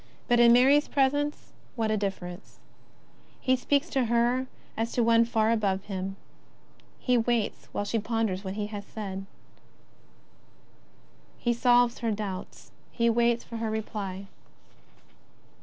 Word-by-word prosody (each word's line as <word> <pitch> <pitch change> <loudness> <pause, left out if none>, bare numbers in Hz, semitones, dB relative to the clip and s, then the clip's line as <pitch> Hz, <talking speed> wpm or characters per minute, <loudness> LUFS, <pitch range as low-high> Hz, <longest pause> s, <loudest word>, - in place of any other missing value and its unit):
But 240 -1 +3
in 235 0 +7
Mary's 270 +5 +5
presence, 290 +2 0 0.2
what 225 -3 0
a - - +2
difference! 195 -3 -5 0.8
He 260 - +2
speaks 280 +4 +1
to 265 -3 +1
her 240 +3 +1 0.3
as 225 +1 -2
to 240 - +2
one 230 0 +5
far 225 -1 +1
above 200 -4 0
him; 195 -1 -4 0.8
he 250 -2 +2
waits 230 -2 -1
while 205 - -2
she 225 +2 0
ponders 215 -3 -1
what 190 0 -5
he 210 -1 -2
has 205 -1 -6
said; 195 -2 -6 2.1
he 240 - 0
solves 245 0 +3
her 230 - -1
doubts; 205 -3 -5 0.2
he 235 -1 +2
waits 235 0 +2
for 230 - -7
her 225 -1 -2
reply. 205 -3 -4
230 Hz, 135 wpm, -28 LUFS, 205-240 Hz, 2.1 s, in